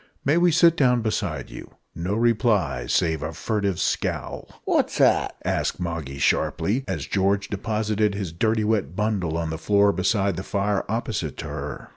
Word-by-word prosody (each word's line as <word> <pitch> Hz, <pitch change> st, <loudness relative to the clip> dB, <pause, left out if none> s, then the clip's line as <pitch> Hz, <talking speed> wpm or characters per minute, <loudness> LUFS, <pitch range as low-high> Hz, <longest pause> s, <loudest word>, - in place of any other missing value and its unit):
May 145 Hz, +3 st, +3 dB
we 175 Hz, 0 st, +4 dB
sit 165 Hz, +1 st, +5 dB
down 125 Hz, -6 st, +3 dB
beside 95 Hz, -, -2 dB
you?" -, -, -10 dB, 0.2 s
No 90 Hz, +5 st, -2 dB
reply, 105 Hz, -, +1 dB
save 80 Hz, -3 st, +1 dB
a 75 Hz, +2 st, -4 dB
furtive 100 Hz, 0 st, -1 dB
scowl. -, -, -2 dB, 0.2 s
"What's -, -, +1 dB
that?" -, -, +3 dB
asked -, -, -1 dB
Moggy, 85 Hz, -6 st, -4 dB
sharply, 105 Hz, -, +1 dB
as 80 Hz, -7 st, -3 dB
George 100 Hz, +3 st, 0 dB
deposited 105 Hz, 0 st, -1 dB
his 95 Hz, -5 st, -4 dB
dirty 110 Hz, +5 st, +1 dB
wet 105 Hz, -8 st, 0 dB
bundle 100 Hz, -6 st, -1 dB
on 80 Hz, -1 st, -2 dB
the 80 Hz, -, -4 dB
floor 100 Hz, +2 st, +3 dB
beside 95 Hz, 0 st, 0 dB
the 95 Hz, -, -4 dB
fire 100 Hz, 0 st, -1 dB
opposite 110 Hz, -, -2 dB
to -, -, -6 dB
her. -, -, -6 dB
100 Hz, 165 wpm, -24 LUFS, 85-110 Hz, 0.2 s, sit